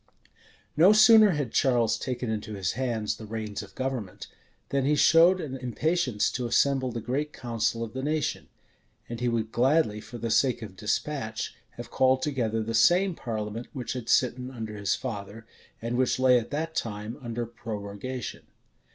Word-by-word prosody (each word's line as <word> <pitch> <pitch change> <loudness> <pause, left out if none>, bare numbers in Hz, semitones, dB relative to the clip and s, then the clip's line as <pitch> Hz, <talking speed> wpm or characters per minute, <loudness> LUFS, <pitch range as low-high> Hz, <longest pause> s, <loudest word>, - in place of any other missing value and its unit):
} - - -28 0.3
No 180 +7 +7
sooner 215 -2 +7
had 145 -6 -2
Charles 120 -4 +2
taken 125 +1 -4
into 110 0 -4
his 95 -5 -1
hands 120 -5 -2
the 110 - -9
reins 110 -1 -4
of - - -13
government, 115 -7 -4 0.4
than 140 -1 0
he 145 +3 +2
showed 165 +5 +6
an 140 -6 -5
impatience 130 -1 0
to 125 -2 -3
assemble 130 +1 +2
the 115 - -4
great 140 +6 -2
council 115 -1 -2
of 115 -1 -7
the 130 - -4
nation; 150 +1 -2 0.6
and 120 -1 -6
he 125 - 0
would 115 -1 -1
gladly, 125 -4 +2
for 120 - -9
the 115 -1 -3
sake 125 -2 +2
of 100 -3 -9
despatch, 110 +2 -3 0.2
have - - -8
called 130 0 +3
together 115 -6 -1
the 115 +1 -4
same 180 - +4
parliament 110 -4 -5
which 125 -5 -4
had 125 -3 -6
sitten 125 0 +2
under 110 -4 -6
his 100 -1 0
father, 110 -2 -6 0.4
and 120 +1 -2
which 130 -1 +2
lay 130 -1 +5
at 115 - -8
that 160 +3 -3
time 105 -1 -4
under 120 -1 -4
prorogation. 110 +1 -6
120 Hz, 175 wpm, -27 LUFS, 110-135 Hz, 0.6 s, No